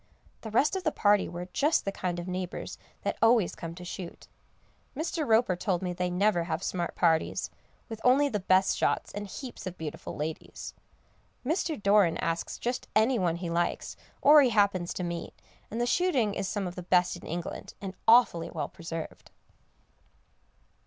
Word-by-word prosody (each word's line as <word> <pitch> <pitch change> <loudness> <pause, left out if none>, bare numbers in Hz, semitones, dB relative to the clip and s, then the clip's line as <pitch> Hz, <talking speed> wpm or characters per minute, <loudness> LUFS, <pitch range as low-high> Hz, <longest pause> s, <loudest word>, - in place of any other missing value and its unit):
The 220 - -6
rest 275 - +2
of 380 - -3
the 315 - +1
party 205 -5 +3
were 175 +1 -5
just 300 +3 +2
the 195 - 0
kind 180 -2 -3
of 175 +1 -5
neighbours 185 -1 -5 0.2
that - - -2
always 225 -4 +4
come 165 0 -7
to 180 0 -9
shoot. 175 -1 -8 0.7
Mr. 315 -1 -2
Roper 220 -4 +4
told 180 0 -1
me 180 -1 -2
they 180 0 -1
never 180 -1 +2
have 165 +1 -3
smart 175 -3 -2
parties, 165 -2 +1 0.4
with 225 -2 -7
only 270 +3 +5
the 215 -7 -1
best 185 +1 +3
shots, - - 0
and 205 0 -5
heaps 240 -1 -8
of 180 - -6
beautiful 155 -2 -6
ladies. 155 +1 -5 0.7
Mr. 315 0 -1
Doran 200 -4 +4
asks 165 0 -2
just 245 +1 -3
any 225 +3 +4
one 175 -3 +1
he 170 -1 -4
likes, 170 +1 -1 0.3
or 295 +1 +9
he 265 - +4
happens 200 -5 +2
to 180 - -3
meet, 170 -1 -5 0.3
and 225 - -4
the 240 - +2
shooting 255 - +2
is 195 -1 -2
some 205 0 -2
of 175 - -4
the 180 - -6
best 180 0 +2
in 175 - -10
England, 170 +1 -5
and 195 -2 -6
awfully 225 -8 +5
well - - -4
preserved. 165 -1 -7
190 Hz, 180 wpm, -29 LUFS, 175-230 Hz, 0.7 s, or